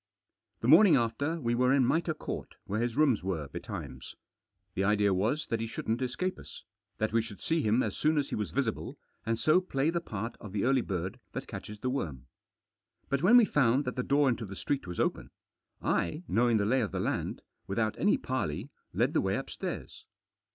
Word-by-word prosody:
The 115 - -1
morning 170 +7 +8
after 140 +7 0
we 120 -5 0
were 125 +1 +3
in 135 -2 +4
Mitre 160 +4 +1
Court, - - -6
where 105 +3 -1
his 120 +1 -1
rooms 145 -8 +4
were, 85 -6 -3
betimes. - - -7 0.6
The 95 - 0
idea 105 0 +3
was 115 +11 0
that 115 - +1
he 115 - -2
shouldn't 115 +2 -2
escape 130 +9 -2
us, - - -11 0.3
that 110 0 -1
we 115 - +4
should 110 -3 -9
see 165 0 0
him 110 +2 +2
as - - -2
soon 155 +1 +2
as 145 -1 0
he - - -2
was 105 - -2
visible, 125 -5 -2 0.3
and 115 0 +1
so 155 +9 +4
play 150 -4 0
the 170 0 -1
part 110 - -5
of 105 -4 -9
the 100 - 0
early 130 +1 +3
bird 95 -3 -4
that - - -4
catches 105 0 -8
the 130 - 0
worm. 75 - -3 0.8
But 140 -1 0
when 215 +9 +7
we 240 - +7
found 140 - +2
that 125 - -3
the 125 - 0
door 140 +2 +3
into 120 -3 0
the 100 - -8
street 140 +2 -2
was 90 -1 -6
open, - - 0 0.5
I, 150 - 0
knowing 120 0 +3
the 100 - +1
lay 130 +5 +2
of 105 - -2
the - - -3
land, - - -2 0.2
without 110 +2 0
any 205 - +3
parley, 105 - -3 0.2
led - - +1
the - - +3
way - - 0
upstairs. - - -6
120 Hz, 205 wpm, -30 LUFS, 105-140 Hz, 0.8 s, morning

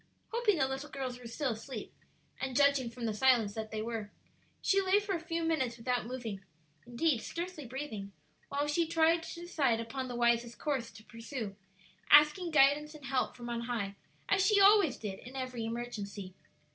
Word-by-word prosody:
Hoping 450 -5 +2
the 265 - +2
little 270 +3 -5
girls 260 -3 -4
were 245 - -9
still 255 +3 -1
asleep, 225 +1 -7 0.5
and 265 -2 -3
judging 280 -3 +4
from 235 0 -6
the 220 - 0
silence 230 -2 +3
that 220 0 -5
they 215 0 -3
were, 225 -2 -4 0.5
she 395 0 +3
lay 385 +1 +4
for 410 -1 -3
a 345 - -1
few 330 0 -3
minutes 265 -8 0
without 245 -1 -1
moving, 230 -6 -5 0.4
indeed 245 +1 +1
scarcely 340 -5 -5
breathing, 230 -6 -5 0.4
while 285 +1 0
she 325 +3 +1
tried 330 +1 +3
to 335 +1 -8
decide 280 -9 +1
upon 255 +3 -4
the 245 - -5
wisest 235 0 +2
course 265 -6 -2
to 205 +2 -14
pursue, 230 -2 -6 0.5
asking 300 +5 +6
guidance 300 +1 +4
and 295 -3 -11
help 260 0 0
from 240 -1 -7
on 235 -1 -2
high, 225 -5 -3 0.3
as 390 -1 +3
she 410 0 +4
always 400 -5 +6
did 195 -3 -5
in 255 +2 -11
every 255 -3 -3
emergency. 210 -5 -5
255 Hz, 185 wpm, -32 LUFS, 230-305 Hz, 0.5 s, asking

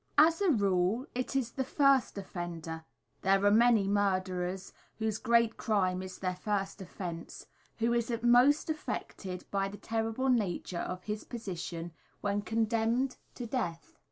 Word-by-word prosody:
As 325 +5 +6
a 395 - +4
rule, 200 - +2
it 255 +2 -3
is 250 -3 0
the 265 - -2
first 275 -4 +3
offender 170 -4 -5 0.4
there 195 +1 +3
are 205 - +6
many 225 -2 +5
murderers 185 -2 0 0.2
whose 220 -1 -1
great 230 -1 +3
crime 185 -4 +1
is 185 0 -7
their 185 -1 -2
first 200 0 -2
offence 175 -2 -7 0.3
who 230 +1 +1
is 235 0 0
most 245 +5 +5
affected 190 - -5
by 195 -1 +1
the 200 +1 -8
terrible 225 +4 -1
nature 190 -7 0
of 180 +1 -4
his 210 0 -4
position 175 -7 -5 0.3
when 205 0 0
condemned 230 +4 0 0.2
to 245 - -5
death. 215 -9 -3
205 Hz, 145 wpm, -31 LUFS, 185-235 Hz, 0.4 s, As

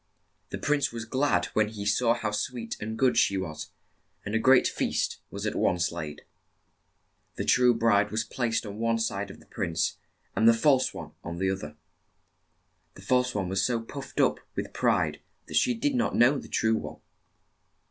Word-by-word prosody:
The - - -4
prince 145 -1 +1
was 115 -1 -6
glad 130 +5 +1
when 110 -1 +3
he 105 -1 -7
saw 115 +3 +3
how 110 -3 -2
sweet 115 +2 -3
and 110 +1 -5
good 130 0 +3
she 100 - +2
was, 85 -2 -5 0.6
and 105 - -4
a 110 - +2
great 130 +2 +5
feast - - -1
was - - -6
at - - -1
once 90 0 +1
laid. 75 -3 -6 1.1
The - - -3
true 125 -1 +4
bride 105 -3 +3
was 110 +2 -1
placed 115 -2 -2
on 105 0 -7
one 115 0 +1
side 100 -3 -2
of - - -11
the - - -19
prince, 80 -1 -2 0.4
and 110 - +4
the 115 - +5
false 130 +2 +3
one 75 -2 -8
on 85 0 -5
the 95 +1 +1
oth 95 0 -4
er. 75 0 -11 1.2
The - - -13
false 125 -1 +1
one 95 -3 -1
was 95 +2 0
so 120 -2 +1
puffed 135 +4 -8
up - - +3 0.2
with - - -4
pride - - +1 0.2
that - - -11
she 250 -1 +3
did 285 +5 0
not 245 -2 0
know 130 +4 +4
the - - -10
true 110 0 +2
one. - - -7
110 Hz, 190 wpm, -27 LUFS, 100-125 Hz, 1.2 s, great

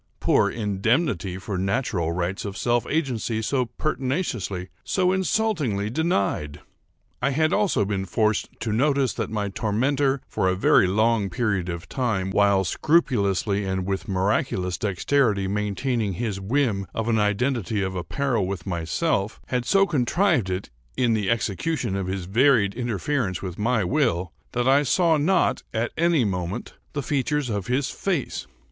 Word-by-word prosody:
Poor - - +3
indemnity 105 - 0
for 95 -1 -4
natural 95 -4 0
rights 90 +2 -2
of 100 -1 -5
self 120 +2 +1
agency 125 -7 -1
so 125 +3 0
pertinaciously, 125 - -2
so 185 -1 +1
insultingly 175 - 0
denied! 100 - -1 0.6
I 135 - +2
had 155 +3 +1
also 200 - +2
been 95 -1 -2
forced 110 +3 +1
to 110 - -1
notice 135 +1 +2
that - - -3
my 105 -2 -2
tormentor, 135 +7 0
for 95 - 0
a 95 - +1
very 95 0 +4
long 110 +1 +2
period 100 -3 -1
of 85 0 -5
time, 105 -8 -1
(while 100 -1 +3
scrupulously 100 - +1
and 95 -1 -2
with 100 +5 -3
miraculous 95 -2 0
dexterity 105 0 +1
maintaining 105 +2 -1
his 100 +1 -3
whim 105 -3 0
of 115 0 -2
an 115 -2 +2
identity 105 0 0
of 95 0 -2
apparel 115 +3 -1
with 95 -4 -5
myself,) 95 - -1
had 125 -1 -1
so 195 +10 +4
contrived 155 - +1
it, 95 -6 -4 0.3
in 120 -2 +3
the 105 -3 0
execution 115 - -1
of 95 -2 -2
his 95 -1 -3
varied 110 0 +3
interference 120 -4 -2
with 90 -1 -6
my 115 0 +1
will, 95 - 0 0.2
that 125 +1 0
I 135 +2 +5
saw 165 +3 +3
not, 175 +6 +2
at 115 +2 0
any 165 -6 +3
moment, 90 +2 -3 0.2
the 145 -2 -2
features 145 -1 0
of 100 -3 -3
his 130 +3 0
face. 175 -9 -2
110 Hz, 150 wpm, -24 LUFS, 95-135 Hz, 0.6 s, I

